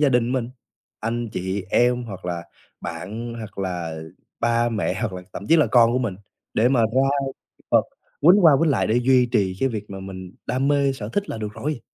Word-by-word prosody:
gia 145 - +5
đình 125 -1 +2
mình, 125 -3 -1 0.5
anh 115 +1 -2
chị 95 0 -3
em, 120 0 +3
hoặc 95 -5 -8
là 85 -1 -3 0.4
bạn, 105 +8 -5
hoặc 110 -4 -9
là 90 -4 -3 0.4
ba 120 0 +2
mẹ, 110 -4 -1
hoặc 110 -5 -1
là 90 0 -6
thậm 100 - -7
chí 165 - +5
là 155 - +4
con 120 -1 +5
của 125 - +2
mình, 110 -7 -2 0.4
để 115 +3 +4
mà 130 -3 +3
ra 130 +5 +2 0.6
vợt - - +5 0.4
quýnh 180 +5 +6
qua 160 - +9
quýnh 165 -2 +3
lại - - +2
để 110 - +2
duy 125 0 +4
trì 100 -6 0
cái 135 - +3
việc 105 -4 -5
mà 95 - -6
mình 95 -1 -8
đam 130 +2 0
mê 140 -1 +3
sở 110 -5 -6
thích 205 - -2
là - - -4
được 105 -1 -4
rồi. 145 +2 -3
115 Hz, 215 wpm, -23 LUFS, 100-130 Hz, 0.6 s, qua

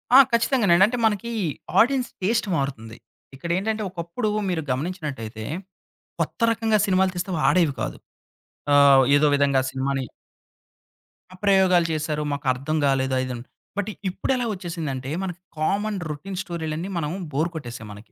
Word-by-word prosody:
ఆ! - - +11
ఖచ్చితంగానండి. 225 -7 +4
అంటే 245 +3 -2
మనకి 220 +2 0 0.5
ఆడియన్స్ 255 +1 +3
టేస్ట్ 225 +3 +1
మారుతుంది. 115 -6 -3 0.4
ఇక్కడేంటంటే, 190 +8 -1
ఒకప్పుడు 175 +5 -3 0.2
మీరు 170 -3 0
గమనించినట్టయితే, 130 -8 -4 0.8
కొత్త - - -2
రకంగా 225 -1 +1
సినిమాలు 190 -1 +3
తీస్తే 180 +2 -3
అవి 155 - -1
ఆడేవి 165 -7 +3
కాదు. - - -3 0.8
ఆ! - - +7 0.4
ఏదో 150 - +4
విధంగా 140 -2 +3
సినిమాని 135 0 -1 1.3
ఆ - - -11
ప్రయోగాలు 190 -3 +4
చేశారు. 150 -1 -2
మాకు 140 +1 -5
అర్థం 140 +5 -2
గాలేదు 130 -1 +1
అది 130 - 0
ఇదని. 120 -2 -5 0.3
బట్ 205 +1 -1 0.2
ఇప్పుడు 185 - -2
ఎలా 245 - -1
వచ్చేసిందంటే, 160 -8 -4
మనకి 180 -1 -5 0.2
కామన్ 200 +6 0
రొటీన్ 165 +6 -6
స్టోరీలన్నీ 165 +1 -4
మనం 150 -1 -2 0.2
బోర్ 155 +5 0
కొట్టేసాయి 120 -7 -7
మనకి. 105 +3 -13
170 Hz, 140 wpm, -24 LUFS, 140-195 Hz, 1.3 s, ఆ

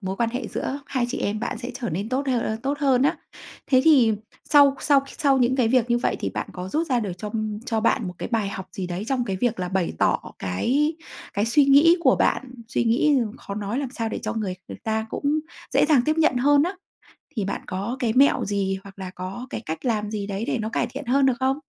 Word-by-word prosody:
mối 190 -1 -4
quan 230 +1 0
hệ 245 -2 -4
giữa 280 +2 -3
hai 255 -3 -1
chị - - -3
em 210 +1 -2
bạn 225 - -3
sẽ 245 +1 -5
trở 255 -3 -4
nên 195 +7 -3
tốt 265 +3 -1
hơ 255 -2 +2
ơ, 220 - -2
tốt 280 +2 -1
hơn 265 -4 +3
nhá. 280 - +2 0.5
Thế 260 -2 +4
thì 260 -9 +6 0.4
sau 285 -2 +6
sau 280 -2 +4 0.2
sau 280 -4 +3
những 255 +1 +2
cái 245 -4 +3
việc 245 -1 +2
như 240 - +3
vậy - - 0
thì - - -2
bạn - - -4
có 180 0 -6
rút 320 - -1
ra 250 -3 +1
được 200 -5 -3
cho 210 +3 -5 0.4
cho 225 -3 0
bạn 225 -2 +1
một 180 - -7
cái - - -4
bài 215 -3 +1
học 190 -1 -7
gì 185 -2 -4
đấy 180 +3 -4
trong 255 -3 0
cái 195 -4 -2
việc 230 -1 0
là 180 - -2
bày 185 -1 -1
tỏ - - +2 0.2
cái 270 - 0 0.4
cái 200 - +1
suy 285 +5 +4
nghĩ 290 +6 +6
của - - +4
bạn, 255 -2 0
suy 235 - 0
nghĩ 265 +6 +3 0.2
khó 200 - -7
nói 210 +4 -3
làm 275 -3 -3
sao 230 -3 -3
để - - -4
cho - - -2
người 205 -5 -2
người - - -8
ta 220 0 -1
cũng - - -5 0.5
dễ - - +5
dàng 290 -6 +4
tiếp 310 +1 +2
nhận 315 -5 +3
hơn 285 +3 +4
á? 365 +4 -2 0.6
Thì 205 -4 -1
bạn 200 - -3
có 200 +7 -3
cái 230 -3 0
mẹo 275 +4 +4
gì, 195 -1 -1
hoặc 195 0 -13
là 185 -1 -5
có 190 +8 -7
cái - - -5
cách 160 - -5
làm 210 -3 0
gì 205 -2 -3
đấy 200 +1 -3
để - - 0
nó 220 0 -3
cải 240 - 0
thiện 270 +4 -7
hơn 270 +3 +3
được 265 - +4
không? 265 +2 +1
240 Hz, 255 wpm, -24 LUFS, 205-270 Hz, 0.6 s, thì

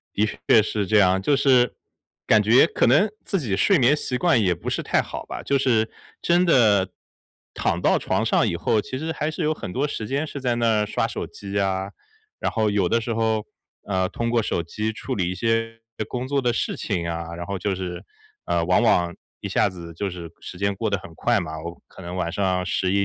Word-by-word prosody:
的 105 +1 +3 0.2
确 110 - +6
是 105 -2 -2
这 110 +1 +4
样， 95 -1 +4
就 140 +8 +2
是， 130 -3 +4 0.5
感 110 -1 +5
觉 120 +8 +6
可 - - +1
能 210 +2 +5 0.2
自 195 - -1
己 110 -10 -1
睡 180 - +4
眠 135 +4 +4
习 125 -3 -3
惯 170 -10 +3
也 90 -4 +2
不 85 - -8
是 - - -1
太 - - +2
好 - - -7
吧。 - - -6
就 140 - +1
是 115 -5 +2 0.3
真 175 +1 +3
的 105 - +4 0.7
躺 - - 0
到 - - +3
床 - - 0
上 - - +2
以 - - -1
后， 110 - +1
其 130 +5 -6
实 160 +2 -3
还 155 0 -2
是 160 - -4
有 155 +1 +2
很 90 - -7
多 140 +4 0
时 110 -7 -5
间 140 +5 -1
是 140 - -7
在 120 -2 0
那 115 -2 +2
儿 105 - 0
刷 - - 0
手 - - -5
机 100 0 -5
啊。 95 0 -1 0.5
然 - - -1
后 110 -2 +1
有 100 -3 +1
的 115 - +2
时 115 0 -3
候， 110 -1 0 0.4
呃， 95 -2 0
通 115 0 -2
过 120 -2 +2
手 85 - -1
机 105 +6 -3
处 - - -5
理 90 -3 -1
一 - - -3
些 115 +2 -1 0.3
工 125 0 -3
作 140 0 0
的 120 -2 +1
事 - - -2
情 85 -5 -2
啊。 85 0 -4
然 85 0 -6
后 100 -1 -3
就 100 +1 -1
是， 90 -1 -5 0.4
呃， 85 -1 +1
往 90 +6 +3
往 85 -6 +3 0.3
一 - - -4
下 - - +2
子 85 -2 -9
就 100 +3 -2
是 85 -2 -8
时 90 - -9
间 100 0 0
过 110 +2 -2
得 100 - +1
很 85 - -12
快 120 +5 +1
嘛。 80 -2 -5
我 85 0 -7
可 95 - -14
能 90 +1 -6
晚 85 -2 -2
上 95 -2 0
11 100 +1 +1
105 Hz, 245 characters per minute, -23 LUFS, 95-120 Hz, 0.7 s, 确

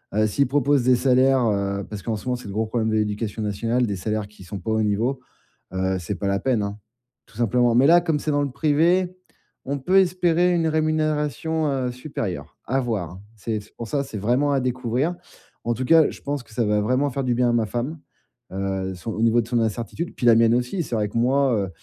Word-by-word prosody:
heu, 110 0 +3
s'ils 140 +7 +1
proposent 140 0 +2
des 125 +1 +5
salaires 130 0 +3
heu 100 -2 0
parce 105 -2 -7
qu'en 110 +4 -2
ce 105 - -8
moment, 125 -1 0
c'est 125 - -9
le 100 - -6
gros 110 +2 0
problèmes 110 0 -1
de 110 - 0
l'éducation 105 0 -2
nationale, 115 +4 0
des 100 -3 -2
salaires 105 +2 -3
qui 105 -2 -16
sont 95 +2 -7
pas 110 +5 -4
au 110 0 +2
niveau, 110 +6 0 0.5
heu, 95 0 0
c'est 90 +3 -4
pas 100 +2 -3
la 100 0 +1
peine 120 -4 0
hein. 100 +1 -5 0.5
Tout 115 - -18
simplement. 120 +1 +2
Mais 125 +3 +5
là, 175 +1 +6
comme 165 -3 0
c'est 155 - -2
dans 145 0 +1
le 140 - -2
privé, 170 +6 +2 0.5
on 140 +2 -2
peut 185 +9 +2
espérer 180 -1 +3
une 165 -1 +1
rémunération, 155 0 0
heu, 130 -2 -1
supérieure, 125 - -6
à 135 +4 0
voir 110 -10 -2
hein. 90 +2 -11
C'est 110 +1 -3
c'est 105 - -20
pour 115 - -6
ça, 140 +5 -1
c'est 135 -6 -7
vraiment 125 +8 +1
à 135 - +2
découvrir. 130 +5 -1 0.5
En 120 - 0
tout 130 - -3
cas, 160 +3 +5
je - - -11
pense 145 -1 -3
que - - -25
ça 115 +1 0
va 105 0 +2
vraiment 130 +6 +1
faire 135 +2 -2
du 125 -2 0
bien 125 0 +2
à - - +1
ma 115 -2 +2
femme, 125 +9 -4 0.5
heu, 95 0 -2
son 110 +5 -6
au 110 - -3
niveau 115 +1 +4
de 110 - -8
son 120 -1 +1
incertitude, 115 +9 -3
puis 125 - -3
la 115 - +7
mienne 115 0 +4
aussi. 125 +9 -1
C'est 120 - -4
vrai 105 -1 0
que 105 - -4
moi, 125 -5 +2
120 Hz, 240 wpm, -23 LUFS, 105-140 Hz, 0.5 s, la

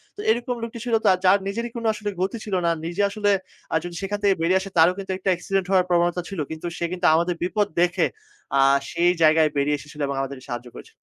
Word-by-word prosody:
তো - - -16
এরকম 240 +2 +1
লোকটি 230 0 -6
ছিল 235 - -2 0.3
যার 195 +2 +6
নিজেরই 230 +4 -3
কোনো 230 -1 -2
আসলে 210 -1 -4
গতি 195 +5 -1
ছিল 205 - -6
না 170 - +3
নিজে 175 +4 -2
আসলে 205 0 0 0.4
আ - - +2
যদি 175 -1 -7
সেখান 205 +1 -2
থেকে 195 -2 +4
বেরিয়ে 185 +3 +3
আসে 195 - -7
তারও 165 +3 +6
কিন্তু 195 -1 -5
একটা 190 0 -2
অ্যাক্সিডেন্ট 185 +1 -1
হওয়ার 185 -1 +4
প্রবণতা 175 0 +2
ছিল। 195 -4 -6
কিন্তু 160 +2 -7
সে 170 - -1
কিন্তু 180 0 -2
আমাদের 170 +1 +1
বিপদ 205 +3 +1
দেখে 175 0 +2 0.5
আ - - +6 0.3
সেই 175 +1 +3
জায়গায় 155 0 +5
বেরিয়ে 145 +1 +1
এসেছিল 150 +1 -13
এবং 140 - -3
আমাদেরকে 135 -1 -6
সাহায্য 120 0 -5
করেছিল। - - -12
180 Hz, 220 wpm, -23 LUFS, 170-205 Hz, 0.5 s, যার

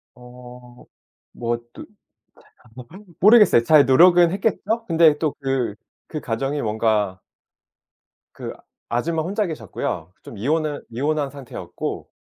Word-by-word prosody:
어 125 0 -14 0.5
뭐 120 0 -2 0.2
또 - - -10
제가 - - -30 1.1
뭘 210 - -18
한 170 - -21
모르겠어요. 210 - +6
잘 150 +1 +5
노력은 175 +5 +6
했겠죠? 220 +3 -1
근데 160 -2 +4
또 155 -2 -1
그 135 -6 -1 0.3
그 155 - -5
가정이 135 +5 -2
뭔가 105 -3 0 1.2
그 - - -7 0.4
아줌마 160 +7 -1
혼자 205 +4 -1
계셨고요. 105 - -5
좀 110 - -11
이혼을 150 +5 -1
이혼한 145 +4 -1
상태였고 140 -3 -7
140 Hz, 245 characters per minute, -22 LUFS, 120-165 Hz, 1.2 s, 모르겠어요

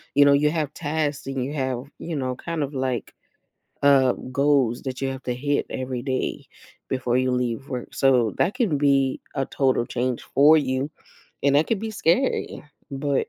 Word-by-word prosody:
you 145 - +7
know, 140 - +6
you 145 +1 +3
have 155 -3 -2
tasks 150 -3 -2
and 135 -2 -2
you 140 +3 -4
have, 130 -4 -2 0.2
you 165 -1 -5
know, 130 -3 -2
kind 165 +3 -3
of, 140 +1 -5
like, 130 -2 -2 0.7
uh, 135 -3 +5 0.2
goals 135 -3 +2
that 130 -1 -5
you 135 - -1
have 130 -1 -6
to 125 - -1
hit 145 +3 -1
every 130 -1 -4
day 130 -1 -2 0.4
before 130 -2 0
you 130 0 +2
leave 125 +2 -2
work, 125 -3 -6
so 125 -5 +3
that 195 - +2
can 215 - +1
be 140 -2 +2 0.2
a 135 - +1
total 130 -3 +1
change 125 0 -2
for 150 +3 +7
you, 135 0 0 0.5
and 140 0 +3
that 150 - +3
could 225 - +1
be 220 0 -3
scary, 200 - 0 0.3
but, 140 0 -1
135 Hz, 185 wpm, -24 LUFS, 130-145 Hz, 0.7 s, you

